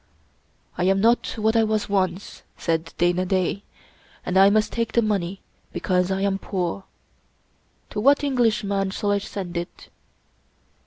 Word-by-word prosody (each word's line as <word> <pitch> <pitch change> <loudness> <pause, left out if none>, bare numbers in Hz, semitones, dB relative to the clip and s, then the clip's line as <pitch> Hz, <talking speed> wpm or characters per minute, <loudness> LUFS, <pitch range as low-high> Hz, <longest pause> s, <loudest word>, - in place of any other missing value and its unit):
" - - -36
I 180 - +2
am 195 +1 +3
not 230 +4 +2
what 220 +1 +1
I 225 - +5
was 215 -1 0
once," 190 -2 -2 0.2
said 165 -1 -1
Dana 175 +1 +2
Da, 185 +1 0 0.3
" - - -30
and 180 - -2
I 195 +1 +7
must 210 0 +2
take 230 -1 -2
the 235 - +3
money 195 -3 -2 0.3
because 180 0 0
I 190 0 -1
am 195 -1 0
poor. 190 -1 -3 1.1
To 210 - -3
what 280 +6 +4
Eng 275 -3 -1
lishman 205 -4 +1
shall 205 +1 -1
I 205 - +2
send 190 -3 -6
it?" 175 +1 -7
195 Hz, 165 wpm, -23 LUFS, 185-215 Hz, 1.1 s, I